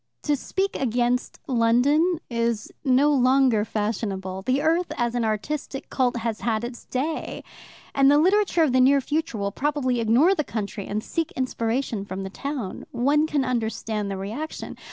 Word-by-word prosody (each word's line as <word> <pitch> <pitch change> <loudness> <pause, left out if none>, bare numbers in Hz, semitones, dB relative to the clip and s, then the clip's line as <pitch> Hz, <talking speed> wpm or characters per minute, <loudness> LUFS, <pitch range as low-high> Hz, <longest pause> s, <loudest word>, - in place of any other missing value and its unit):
To 295 - +2
speak 385 +8 -2
against 245 0 0
London 275 +8 +3
is 230 -2 -1
no 280 +2 +4
longer 255 -4 +4
fashionable. 200 -3 -3
The 255 +7 +1
Earth 335 +3 +1
as 240 -2 0
an 240 -1 0
artistic 265 +6 -3
cult 250 -2 +1
has 230 -2 -3
had 225 -1 0
its 240 0 -7
day, 300 +5 -3 0.5
and 275 0 +5
the 290 - +6
literature 370 +1 +3
of 285 -5 +2
the 255 - +5
near 275 +2 +5
future 305 -1 -2
will 200 -1 -2
probably 265 -1 0
ignore 240 - +4
the 305 - 0
country 210 -4 -5
and 210 +1 -2
seek 330 -2 -2
inspiration 235 -3 -1
from 195 -1 -5
the 190 - -6
town. 265 -6 -5
One 290 +5 +2
can 285 -3 0
understand 220 -4 -2
the 195 - -3
reaction. 225 +12 -5
250 Hz, 165 wpm, -24 LUFS, 220-290 Hz, 0.5 s, the